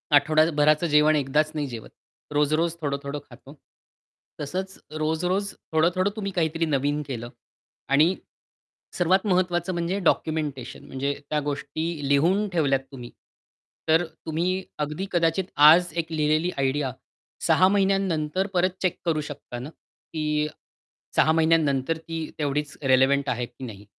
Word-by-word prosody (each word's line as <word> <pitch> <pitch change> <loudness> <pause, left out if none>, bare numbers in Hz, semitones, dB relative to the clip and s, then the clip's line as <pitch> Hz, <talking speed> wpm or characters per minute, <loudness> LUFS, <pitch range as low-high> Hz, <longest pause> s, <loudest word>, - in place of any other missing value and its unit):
आठवडाभराचं 155 +1 +3
जेवण 150 +1 +4
एकदाच 150 +2 +1
नाही 145 -2 -1
जेवत. 115 -3 -8 0.4
रोज-रोज 155 +3 +1
थोडं-थोडं 140 0 -3
खातो, 130 +3 -14 0.9
तसंच 190 +6 -4 0.2
रोज-रोज 180 +6 -1 0.2
थोडं-थोडं 175 +5 +2
तुम्ही 200 -2 -3
काहीतरी 165 -2 0
नवीन 145 0 0
केलं 120 -3 -5 0.6
आणि 155 +7 +4 0.8
सर्वात 190 +4 +2
महत्वाचं 180 -1 +1
म्हणजे 170 +3 -1
डॉक्युमेंटेशन 150 -6 -1
म्हणजे 140 +2 -2 0.2
त्या 150 - +1
गोष्टी 145 +2 -3
लिहून 180 +9 +3
ठेवल्यात 145 -6 +2
तुम्ही, 125 -3 -9 0.8
तर 165 +2 +4 0.2
तुम्ही 180 +4 -1 0.2
अगदी 150 +6 -2
कदाचित 170 +1 +1 0.2
आज 175 +1 +5
एक 165 0 -2
लिहिलेली 155 +3 +1
आयडिया 135 0 0 0.5
6 185 - +4
महिन्यानंतर 190 -3 +1
परत 185 +1 +3
चेक 185 - 0
करू 155 -2 +1
शकता 140 -4 -8
ना, 130 +5 -7
की 150 -2 -4 0.7
6 160 - +4
महिन्यानंतर 160 -2 +2
ती 165 -1 -6
तेवढीच 145 0 -2
रेलेव्हंट 135 +1 +3
आहे 120 0 -1
की 130 - -14
नाही? 105 -3 -10
155 Hz, 125 wpm, -25 LUFS, 140-175 Hz, 0.9 s, आज